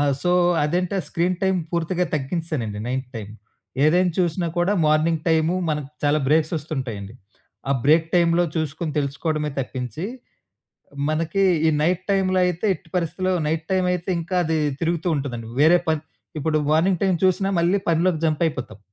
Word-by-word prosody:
ఆ! -, -, +3 dB, 0.2 s
సో 180 Hz, -, +1 dB, 0.3 s
అదంటే, 175 Hz, +5 st, 0 dB
ఆ -, -, -9 dB
స్క్రీన్ 175 Hz, +4 st, 0 dB
టైమ్ 190 Hz, -1 st, +2 dB
పూర్తిగా 170 Hz, +1 st, 0 dB
తగ్గించేసానండి 140 Hz, -7 st, -3 dB
నైట్ 130 Hz, 0 st, -3 dB
టైమ్. 105 Hz, -2 st, -7 dB, 0.5 s
ఏదైనా 175 Hz, +3 st, +3 dB
చూసినా 175 Hz, 0 st, +1 dB
కూడా 175 Hz, +3 st, +2 dB
మార్నింగ్ 155 Hz, +1 st, +2 dB
టైము 160 Hz, +1 st, +2 dB
మనకు 150 Hz, -3 st, -2 dB
చాలా 145 Hz, +1 st, +3 dB
బ్రేక్సొస్తుంటాయండి. 145 Hz, -, -1 dB, 0.6 s
ఆ -, -, +5 dB
బ్రేక్ 160 Hz, +3 st, +4 dB
టైమ్‌లో 170 Hz, 0 st, +4 dB
చూసుకొని 155 Hz, 0 st, -2 dB
తెలుసుకోవడమే 150 Hz, +2 st, -1 dB
తప్పించి, 125 Hz, -, -5 dB, 1.0 s
మనకి 165 Hz, +5 st, 0 dB, 0.3 s
ఈ -, -, +4 dB
నైట్ 180 Hz, +3 st, +1 dB
టైమ్‌లో 190 Hz, -1 st, +2 dB
అయితే 180 Hz, +3 st, -1 dB
ఎట్టి 180 Hz, -2 st, -15 dB
పరిస్థితిలో 180 Hz, +2 st, -1 dB
నైట్ 160 Hz, +1 st, -1 dB
టైమయితే 180 Hz, -1 st, 0 dB
ఇంకా 170 Hz, +3 st, -3 dB
అది 160 Hz, 0 st, 0 dB, 0.2 s
తిరుగుతూ 170 Hz, +1 st, 0 dB
ఉంటదండి. 120 Hz, -5 st, -4 dB
వేరే 170 Hz, +3 st, +6 dB
పని 160 Hz, -1 st, +1 dB, 0.4 s
ఇప్పుడు 155 Hz, +1 st, +1 dB
మార్నింగ్ 170 Hz, +3 st, +2 dB
టైమ్ 190 Hz, -2 st, +2 dB
చూసినా 190 Hz, +1 st, +2 dB
మళ్ళీ 175 Hz, +4 st, +3 dB
పనిలోకి 165 Hz, 0 st, +2 dB
జంపయిపోతాం. 155 Hz, -, -1 dB
160 Hz, 145 wpm, -23 LUFS, 150-180 Hz, 1.0 s, వేరే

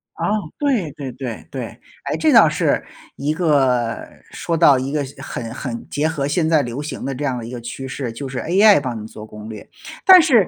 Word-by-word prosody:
啊， -, -, -2 dB, 0.3 s
对 250 Hz, -, 0 dB
对 140 Hz, -2 st, -7 dB
对 125 Hz, -3 st, -7 dB
对， -, -, -4 dB, 0.4 s
诶， -, -, -1 dB
这 -, -, +3 dB
倒 -, -, +8 dB
是 -, -, +1 dB, 0.3 s
一 145 Hz, +2 st, -1 dB
个 135 Hz, -8 st, +2 dB, 0.3 s
说 165 Hz, -, -2 dB
到 145 Hz, -5 st, +6 dB
一 130 Hz, +2 st, -3 dB
个 150 Hz, -1 st, 0 dB, 0.2 s
很 115 Hz, -2 st, -6 dB
很 120 Hz, -2 st, -6 dB
结 150 Hz, +2 st, 0 dB
合 150 Hz, -4 st, -2 dB
现 155 Hz, +3 st, +1 dB
在 155 Hz, -2 st, +4 dB
流 120 Hz, +2 st, -4 dB
行 150 Hz, -3 st, -6 dB
的 135 Hz, 0 st, -3 dB
这 140 Hz, -, -5 dB
样 130 Hz, -3 st, -1 dB
的 115 Hz, -, -7 dB
一 115 Hz, -, -8 dB
个 125 Hz, -1 st, -6 dB
趋 125 Hz, +3 st, -6 dB
势， 130 Hz, -2 st, -4 dB
就 135 Hz, +5 st, -6 dB
是 130 Hz, 0 st, -4 dB
AI 200 Hz, +2 st, +5 dB
帮 120 Hz, -5 st, -4 dB
你 105 Hz, -, -8 dB
做 105 Hz, -1 st, -10 dB
攻 105 Hz, 0 st, -10 dB
略。 105 Hz, -2 st, -9 dB, 0.4 s
但 370 Hz, -1 st, +10 dB
是 245 Hz, -, +4 dB
135 Hz, 240 characters per minute, -20 LUFS, 120-155 Hz, 0.4 s, 但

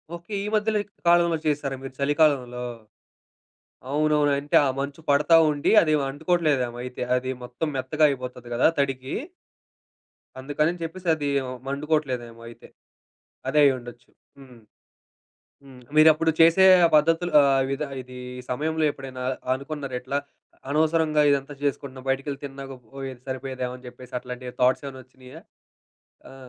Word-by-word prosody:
Okay. 170 Hz, +5 st, -10 dB
ఈ -, -, -3 dB
మధ్యలో 215 Hz, 0 st, +1 dB, 0.3 s
కాలంలో 170 Hz, -1 st, +4 dB
చేసారా, 145 Hz, -2 st, -1 dB
మీరు 135 Hz, -, -8 dB
చలికాలంలో? 140 Hz, -4 st, +1 dB, 1.3 s
అవునవును. 150 Hz, 0 st, +2 dB
అంటే 145 Hz, +1 st, -2 dB
ఆ -, -, +1 dB
మంచు 140 Hz, +2 st, -4 dB
పడతా 145 Hz, +4 st, +4 dB, 0.2 s
ఉండి, 145 Hz, -1 st, 0 dB
అది 155 Hz, -2 st, +1 dB, 0.2 s
అంటుకోవట్లేదేమో 145 Hz, -5 st, 0 dB
అయితే. 125 Hz, 0 st, -7 dB
అది 130 Hz, +1 st, -2 dB
మొత్తం 125 Hz, +6 st, -4 dB
మెత్తగా 135 Hz, +4 st, +1 dB
అయిపోతది 125 Hz, -2 st, -6 dB
కదా! 120 Hz, -, +4 dB
తడికి. 135 Hz, -1 st, -2 dB, 1.3 s
అందుకని 150 Hz, +6 st, -1 dB
చెప్పేసి 180 Hz, +3 st, -7 dB
అది 145 Hz, -2 st, -3 dB, 0.4 s
మండుకోవట్లేదేమో 135 Hz, -5 st, -2 dB
అయితే. 115 Hz, -, -14 dB, 0.8 s
అదే 150 Hz, -, +2 dB
అయ్యుండొచ్చు. 120 Hz, -3 st, -2 dB, 0.3 s
హ్మ్, 130 Hz, -3 st, -15 dB, 1.1 s
హ్మ్. 130 Hz, -2 st, -14 dB, 0.2 s
మీరు 155 Hz, +1 st, +8 dB
అప్పుడు 160 Hz, +1 st, +1 dB
చేసే 165 Hz, +3 st, +6 dB, 0.2 s
ఆ -, -, +2 dB
పద్ధతులు 165 Hz, +3 st, +2 dB
అహ్, 135 Hz, -1 st, +3 dB
విధ 135 Hz, +2 st, -2 dB, 0.2 s
ఇది 125 Hz, 0 st, -12 dB, 0.3 s
సమయంలో 155 Hz, +4 st, -1 dB
ఎప్పుడైనా 135 Hz, -2 st, -8 dB
అ -, -, +1 dB, 0.2 s
అనుకున్నారా 140 Hz, -1 st, -5 dB
ఇట్లా, 140 Hz, +3 st, -2 dB, 0.5 s
అనవసరంగా 155 Hz, 0 st, +2 dB
ఇదంతా 140 Hz, +1 st, -1 dB
చేసుకుంటున్నా, 135 Hz, -2 st, -3 dB
బయటికెళ్ళి 135 Hz, +1 st, -3 dB
తిన్నాక, 135 Hz, -1 st, -7 dB, 0.2 s
పోయేది 135 Hz, -2 st, -7 dB
సరిపోయేదేమో 130 Hz, -1 st, -4 dB
అని 125 Hz, -, -14 dB
చెప్పేసి, 125 Hz, +1 st, -14 dB
అట్లాంటి 125 Hz, 0 st, -8 dB
థాట్స్ 125 Hz, +2 st, +3 dB
ఏమైనా 130 Hz, -1 st, -8 dB
వచ్చినియా? 130 Hz, +4 st, -14 dB, 0.9 s
ఆ! -, -, -13 dB
140 Hz, 130 wpm, -24 LUFS, 130-155 Hz, 1.3 s, మీరు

